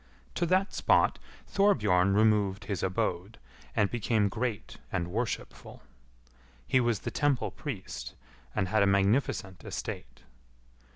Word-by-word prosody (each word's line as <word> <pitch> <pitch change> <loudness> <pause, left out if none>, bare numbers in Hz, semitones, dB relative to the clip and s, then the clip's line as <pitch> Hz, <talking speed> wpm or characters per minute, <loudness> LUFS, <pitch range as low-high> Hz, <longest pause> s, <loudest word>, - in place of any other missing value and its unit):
To 175 - 0
that 185 +3 +2
spot - - +3 0.3
Thorbjorn 105 - +3
removed 105 -2 +3
his 100 -3 -3
abode, 95 +2 -2 0.4
and 100 -2 +2
became 110 -3 +1
great 115 0 -3
and 90 -2 -2
worshipful. 115 +5 -4 0.8
He 130 - +4
was 120 -5 +1
the - - -4
temple 145 -4 +1
priest, 130 -11 -6 0.4
and 95 - +1
had 110 +1 +3
a 100 - +4
magnificent 100 -1 +1
estate. - - -6
105 Hz, 120 wpm, -29 LUFS, 95-120 Hz, 0.8 s, He